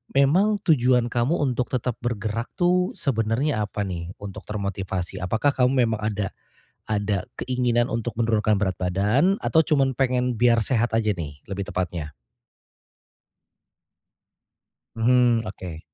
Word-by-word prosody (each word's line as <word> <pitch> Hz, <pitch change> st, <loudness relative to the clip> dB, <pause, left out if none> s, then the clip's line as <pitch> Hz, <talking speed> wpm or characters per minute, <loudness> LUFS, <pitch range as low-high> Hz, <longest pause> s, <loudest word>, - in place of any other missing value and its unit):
Memang 180 Hz, +11 st, +4 dB
tujuan 125 Hz, -6 st, +3 dB
kamu 120 Hz, +7 st, +1 dB
untuk 125 Hz, -3 st, 0 dB
tetap 125 Hz, -1 st, -1 dB
bergerak 115 Hz, -1 st, -2 dB
tuh 180 Hz, 0 st, +2 dB
sebenarnya 115 Hz, 0 st, 0 dB
apa 105 Hz, -, -3 dB
nih 90 Hz, -2 st, -5 dB
untuk 100 Hz, -2 st, -7 dB
termotivasi? 95 Hz, -3 st, -3 dB
Apakah 110 Hz, +10 st, +1 dB
kamu 125 Hz, 0 st, +3 dB, 0.2 s
memang 110 Hz, -1 st, -2 dB
ada 105 Hz, -2 st, -2 dB, 0.6 s
ada 105 Hz, -2 st, -1 dB, 0.2 s
keinginan 125 Hz, -1 st, +1 dB
untuk 115 Hz, 0 st, -2 dB
menurunkan 110 Hz, -2 st, +2 dB
berat 95 Hz, -2 st, 0 dB
badan 105 Hz, -, +2 dB
atau 160 Hz, -, +4 dB
cuman 135 Hz, -4 st, +2 dB
pengen 125 Hz, -2 st, +1 dB
biar 120 Hz, -1 st, +5 dB
sehat 120 Hz, 0 st, +1 dB
aja 110 Hz, -1 st, +1 dB
nih 75 Hz, -3 st, -7 dB
lebih 100 Hz, 0 st, -3 dB
tepatnya. 85 Hz, -4 st, -3 dB, 2.8 s
Mhm, 120 Hz, 0 st, +3 dB
oke. 90 Hz, -6 st, -7 dB
115 Hz, 125 wpm, -24 LUFS, 100-125 Hz, 2.8 s, biar